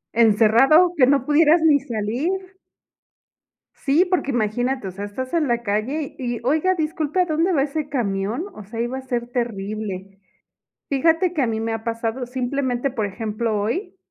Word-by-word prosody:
Encerrado 235 Hz, -, +5 dB
que 255 Hz, -4 st, +5 dB
no 275 Hz, -2 st, +2 dB
pudieras 310 Hz, +3 st, +4 dB
ni 300 Hz, -3 st, +5 dB
salir. 240 Hz, +3 st, -2 dB, 1.5 s
Sí, 310 Hz, +6 st, +2 dB
porque 350 Hz, -6 st, 0 dB
imagínate, 245 Hz, +1 st, -1 dB
o -, -, -5 dB
sea, 200 Hz, +3 st, -6 dB
estás 255 Hz, +8 st, -6 dB
en 320 Hz, -3 st, +2 dB
la 235 Hz, -1 st, 0 dB
calle 240 Hz, +8 st, -2 dB
y, 240 Hz, -3 st, -3 dB
"oiga, 315 Hz, +8 st, +2 dB
disculpe, 320 Hz, +1 st, -1 dB
¿a -, -, +2 dB
dónde 330 Hz, +2 st, +1 dB
va 275 Hz, -, +3 dB
ese 295 Hz, +1 st, -3 dB
camión?" 220 Hz, -, -2 dB
O 210 Hz, -, -10 dB
sea, 220 Hz, +4 st, -8 dB
iba 240 Hz, +2 st, -2 dB
a -, -, -8 dB
ser 245 Hz, -2 st, -3 dB
terrible. 205 Hz, -5 st, -4 dB, 0.7 s
Fíjate 325 Hz, +6 st, +2 dB
que 315 Hz, -, -1 dB
a -, -, +2 dB
mí 220 Hz, -1 st, -2 dB
me 225 Hz, 0 st, -2 dB
ha 225 Hz, 0 st, -4 dB
pasado, 230 Hz, +2 st, -3 dB
simplemente, 255 Hz, +1 st, -1 dB
por 220 Hz, -5 st, -2 dB
ejemplo, 215 Hz, +1 st, -2 dB
hoy 360 Hz, -, -3 dB
250 Hz, 170 wpm, -22 LUFS, 220-300 Hz, 1.5 s, Encerrado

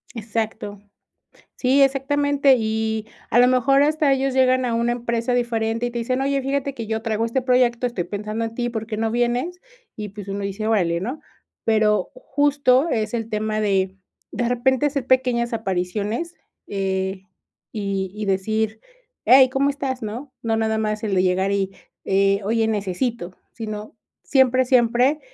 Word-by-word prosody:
Exacto. 215 Hz, -2 st, -4 dB, 0.8 s
Sí, 270 Hz, +2 st, +3 dB
exactamente, 280 Hz, 0 st, +3 dB
y 220 Hz, -1 st, -1 dB, 0.2 s
a 240 Hz, -, +5 dB
lo 250 Hz, -, +6 dB
mejor 275 Hz, +2 st, +4 dB
hasta 300 Hz, -1 st, +2 dB
ellos 270 Hz, 0 st, 0 dB
llegan 255 Hz, 0 st, +3 dB
a 235 Hz, -2 st, 0 dB
una 235 Hz, +1 st, +1 dB
empresa 235 Hz, 0 st, -1 dB
diferente 230 Hz, -1 st, 0 dB
y -, -, -3 dB
te 240 Hz, -, -4 dB
dicen: 255 Hz, +3 st, -1 dB
"Oye, 275 Hz, 0 st, +1 dB
fíjate 275 Hz, 0 st, -2 dB
que 230 Hz, -3 st, -6 dB
yo 220 Hz, 0 st, -2 dB
traigo 225 Hz, 0 st, -1 dB
este 255 Hz, +3 st, -1 dB
proyecto, 250 Hz, -1 st, +2 dB
estoy 200 Hz, -8 st, -3 dB
pensando 210 Hz, +4 st, -4 dB
en 225 Hz, 0 st, -5 dB
ti, 240 Hz, 0 st, -1 dB
¿por 220 Hz, -2 st, -4 dB
qué 215 Hz, -1 st, -4 dB
no 225 Hz, 0 st, 0 dB
vienes?" 245 Hz, +9 st, -1 dB, 0.4 s
Y, 210 Hz, -2 st, -6 dB
pues, 200 Hz, -1 st, -9 dB
uno 200 Hz, +1 st, -3 dB
dice: 200 Hz, +2 st, -3 dB
"Orale, 170 Hz, -6 st, +1 dB
¿no?" 255 Hz, -, -4 dB, 0.4 s
Pero 215 Hz, -1 st, +2 dB
justo 285 Hz, -, +2 dB
es 215 Hz, 0 st, -1 dB
el 225 Hz, -1 st, -2 dB
tema 215 Hz, 0 st, -1 dB
de 195 Hz, -2 st, 0 dB, 0.4 s
de 240 Hz, -1 st, -1 dB
repente 260 Hz, +3 st, +2 dB
hacer 275 Hz, -3 st, -2 dB
pequeñas 250 Hz, -2 st, +2 dB
apariciones, 210 Hz, -, -2 dB, 0.3 s
eh, 190 Hz, -1 st, -2 dB, 0.5 s
y 195 Hz, -3 st, -3 dB
y 210 Hz, 0 st, -4 dB
decir: 215 Hz, +3 st, -1 dB, 0.4 s
"Ey, 260 Hz, 0 st, +7 dB
¿cómo 275 Hz, +2 st, +1 dB
estás?", 265 Hz, -3 st, -4 dB
¿no? 240 Hz, +6 st, -6 dB
No 225 Hz, -1 st, 0 dB
nada 220 Hz, 0 st, 0 dB
más 215 Hz, -1 st, -2 dB
el 210 Hz, -3 st, -1 dB
de 185 Hz, -, +3 dB
llegar 190 Hz, +1 st, +1 dB
y, 195 Hz, -1 st, 0 dB, 0.3 s
eh: 195 Hz, +1 st, +2 dB
"Oye, 225 Hz, +1 st, +1 dB
necesito", 200 Hz, -1 st, -2 dB, 0.2 s
sino 215 Hz, -1 st, -6 dB, 0.3 s
siempre, 260 Hz, -2 st, +3 dB
siempre 250 Hz, +3 st, +3 dB
230 Hz, 165 wpm, -22 LUFS, 210-255 Hz, 0.8 s, Ey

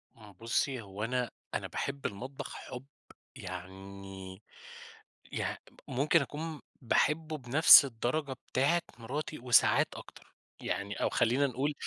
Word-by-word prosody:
إمم. 105 Hz, -3 st, -14 dB
بُصي، 115 Hz, +5 st, -1 dB
هو 100 Hz, 0 st, -7 dB
أنا 125 Hz, +1 st, -1 dB, 0.2 s
أنا -, -, -2 dB
باحب 140 Hz, 0 st, -4 dB
المطبخ 130 Hz, +7 st, -5 dB
حُب 125 Hz, +1 st, -8 dB, 0.5 s
يعني 95 Hz, +1 st, -9 dB, 0.9 s
يع -, -, -2 dB, 0.3 s
ممكن 145 Hz, +6 st, +2 dB
أكون 150 Hz, +2 st, -5 dB, 0.2 s
باحبه 155 Hz, +5 st, +1 dB
بنفْس 140 Hz, +3 st, +8 dB
الدرجة 135 Hz, +3 st, -2 dB, 0.2 s
بتاعة 155 Hz, +7 st, +2 dB, 0.2 s
مراتي 145 Hz, +6 st, -5 dB
وساعات 125 Hz, 0 st, +4 dB
أكتر. -, -, -13 dB, 0.3 s
يعني 100 Hz, 0 st, -3 dB
أو -, -, 0 dB
خلّينا 125 Hz, +4 st, +2 dB
نقول 135 Hz, +3 st, -1 dB
125 Hz, 115 wpm, -31 LUFS, 105-145 Hz, 0.9 s, بنفْس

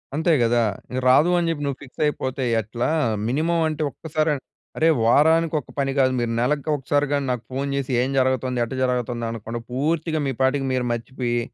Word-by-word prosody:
అంతే 160 Hz, +3 st, +2 dB
గదా! 120 Hz, 0 st, +3 dB, 0.3 s
ఇక 130 Hz, -, -1 dB
రాదు 150 Hz, +7 st, +5 dB
అని 170 Hz, -, 0 dB
జెప్పి 145 Hz, -3 st, -2 dB
నువ్వు 140 Hz, -2 st, -2 dB
ఫిక్స్ 130 Hz, -, -10 dB
అయిపోతే 130 Hz, -2 st, -2 dB, 0.2 s
ఎట్లా? 115 Hz, +3 st, -3 dB, 0.4 s
మినిమమ్ 165 Hz, +6 st, +1 dB
అంటే, 155 Hz, 0 st, -3 dB
ఒక్కసారి, 155 Hz, +1 st, -1 dB, 0.5 s
అరే! 160 Hz, -, +3 dB, 0.2 s
వారానికి 160 Hz, +5 st, +4 dB
ఒక 130 Hz, -, -14 dB
పని 135 Hz, -1 st, +1 dB
గాదు 130 Hz, -1 st, +3 dB
మీరు 120 Hz, -1 st, -1 dB
నెలకొకసారి 145 Hz, +2 st, 0 dB
గాని 140 Hz, -1 st, 0 dB
నాకు 125 Hz, -2 st, -3 dB
ఫోన్ 135 Hz, +2 st, -2 dB
జేసి 140 Hz, -1 st, -2 dB
ఏం 130 Hz, -, 0 dB
జరగుతుంది, 130 Hz, -1 st, +1 dB
ఎట్ట 120 Hz, +2 st, -5 dB
జరగుతుంది 120 Hz, -2 st, -1 dB
అనక్కుండా 115 Hz, +1 st, -5 dB
పూర్తిగా 155 Hz, +4 st, 0 dB
మీ 135 Hz, -, 0 dB
పాటికి 135 Hz, +1 st, +2 dB
మీరు 125 Hz, -1 st, 0 dB
మర్చిపోయి, 120 Hz, +1 st, -2 dB
135 Hz, 175 wpm, -23 LUFS, 125-150 Hz, 0.5 s, రాదు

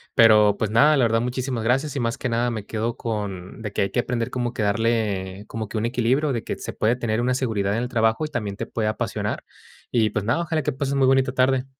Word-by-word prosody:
pero 105 Hz, -2 st, +6 dB
pues, 110 Hz, -, -1 dB
nada, 145 Hz, +7 st, +5 dB
la 130 Hz, -, +3 dB
verdad, 115 Hz, 0 st, +2 dB
muchísimas 125 Hz, -1 st, -2 dB
gracias 135 Hz, +5 st, +1 dB
y 140 Hz, -, -1 dB
más 115 Hz, 0 st, -1 dB
que 130 Hz, -, -3 dB
nada 120 Hz, +1 st, +1 dB
me 110 Hz, -3 st, -5 dB
quedo 115 Hz, +2 st, -2 dB
con 100 Hz, -4 st, -5 dB
de 105 Hz, -2 st, -5 dB
que -, -, +1 dB
hay 100 Hz, -, -2 dB
que 120 Hz, -, +1 dB
aprender 115 Hz, -1 st, -2 dB
como 120 Hz, -1 st, -2 dB
que 110 Hz, -, -2 dB
darle 105 Hz, -3 st, 0 dB
como 110 Hz, -1 st, -5 dB
que -, -, -4 dB
un 110 Hz, -, 0 dB
equilibrio, 125 Hz, +5 st, +1 dB
de 115 Hz, -, -3 dB
que -, -, -4 dB
se -, -, -6 dB
puede 115 Hz, +3 st, +1 dB
tener 115 Hz, -2 st, -1 dB
una 125 Hz, +1 st, +1 dB
seguridad 110 Hz, -6 st, 0 dB
en 115 Hz, +3 st, -1 dB
el 125 Hz, -, -4 dB
trabajo 115 Hz, +1 st, +1 dB
y -, -, -5 dB
también 105 Hz, -8 st, -3 dB
te -, -, -3 dB
puede 110 Hz, -2 st, -2 dB
apasionar. 110 Hz, -, -3 dB, 0.5 s
Y, 110 Hz, -3 st, +3 dB
pues, 105 Hz, -, -2 dB
nada, 125 Hz, +9 st, +1 dB
ojalá 160 Hz, -2 st, -1 dB
que 150 Hz, -, -1 dB
pases 135 Hz, +1 st, -2 dB
muy 135 Hz, -1 st, +3 dB
bonita 130 Hz, -1 st, +3 dB
tarde. 130 Hz, 0 st, +2 dB
115 Hz, 255 wpm, -23 LUFS, 110-130 Hz, 0.5 s, pero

